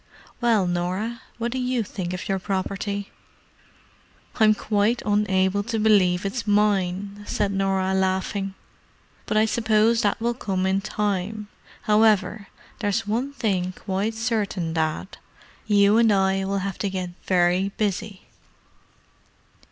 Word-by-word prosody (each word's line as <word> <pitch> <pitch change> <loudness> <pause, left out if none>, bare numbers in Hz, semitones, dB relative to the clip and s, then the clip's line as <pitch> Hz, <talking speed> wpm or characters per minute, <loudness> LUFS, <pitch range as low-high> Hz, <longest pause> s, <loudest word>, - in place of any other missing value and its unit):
"Well, 225 -5 +3
Norah, 185 +7 -2 0.2
what 235 +1 -2
do 260 - -2
you 250 -2 0
think 185 -3 -5
of 185 +2 -5
your 195 -2 0
property?" 195 +1 -3 1.3
"I'm 215 -1 +5
quite 215 +3 0
unable 200 -2 +2
to 230 0 -2
believe 200 -4 +3
it's 210 +2 -3
mine," 205 -1 +1
said 205 -1 0
Norah, 195 -1 0
laughing. 190 +1 -1 0.7
"But 215 - 0
I 215 - +5
suppose 220 +1 +2
that 205 -2 +1
will 235 +1 0
come 190 -6 -2
in 190 +1 +1
time. 210 0 -2 0.3
However, 210 -2 +3 0.3
there's 215 +1 0
one 240 +7 -2
thing 185 -8 -1
quite 200 +4 -2
certain, 210 -7 -1
Dad—you 200 +5 0
and 230 -2 +5
I 190 -1 +2
will 200 +1 -1
have 195 -2 -4
to 200 - -1
get 185 -2 -4 0.2
very 180 +1 +2
busy!" 210 -1 -2
200 Hz, 130 wpm, -24 LUFS, 190-215 Hz, 1.3 s, I'm